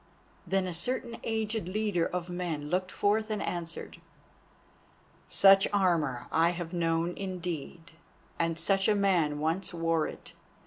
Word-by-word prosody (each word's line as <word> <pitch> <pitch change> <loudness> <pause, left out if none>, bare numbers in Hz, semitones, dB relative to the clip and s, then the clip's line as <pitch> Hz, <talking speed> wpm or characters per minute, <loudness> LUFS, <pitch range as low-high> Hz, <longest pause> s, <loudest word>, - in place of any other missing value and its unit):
Then 195 -1 +1
a 180 - -3
certain 235 +6 -2
aged 220 -3 -2
leader 200 -3 0
of 180 -1 -4
men 170 -5 -4
looked 185 0 0
forth 215 +2 +1
and 215 -1 -1
answered: 170 -3 -5 1.3
"Such 195 0 +6
armour 170 -11 +1
I 165 +1 +4
have 175 0 -5
known 165 0 0
indeed, 175 -4 -5 0.5
and 165 -1 0
such 195 +2 +1
a 215 - +4
man 175 -7 +2
once 165 +4 -1
wore 165 -1 +1
it. - - -10
180 Hz, 135 wpm, -30 LUFS, 165-195 Hz, 1.3 s, Such